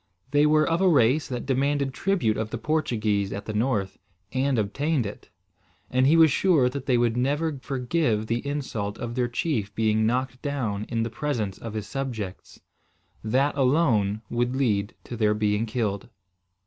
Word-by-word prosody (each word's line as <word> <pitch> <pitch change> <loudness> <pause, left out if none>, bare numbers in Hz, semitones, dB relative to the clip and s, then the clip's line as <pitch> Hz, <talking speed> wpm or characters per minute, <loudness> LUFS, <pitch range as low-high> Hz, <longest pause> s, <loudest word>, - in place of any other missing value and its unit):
They 145 +1 +4
were 155 0 +4
of 165 +2 +1
a 190 - +5
race 140 -1 +3
that 125 -2 -4
demanded 140 +1 0
tribute 175 - +1
of 110 0 -3
the - - -4
Portuguese 110 -10 0
at 100 - -5
the 110 - -4
north, 105 -4 -1 0.3
and 130 0 +1
obtained 130 +6 0
it; 100 - -8 0.6
and 130 +1 +3
he 160 +3 +5
was 160 -2 +7
sure 150 -6 +3
that 135 +1 -6
they 125 -3 +3
would 120 -1 +2
never 145 +4 0
forgive 125 -4 0
the 115 +2 -2
insult 130 -8 -3
of 120 -1 -5
their 125 0 0
chief 120 -5 -2
being 110 0 +2
knocked 125 +1 -1
down 115 -8 -2
in 115 -1 0
the 115 - -4
presence 115 -7 -3
of 115 -2 -7
his 105 -2 -3
subjects. 115 -9 -5 0.6
That, 135 +6 +1
alone, 125 -7 +2
would 120 +3 -1
lead 105 -7 0
to 120 - -7
their 105 -2 +2
being 105 +1 0
killed. 105 -3 -2
125 Hz, 175 wpm, -25 LUFS, 110-140 Hz, 0.6 s, was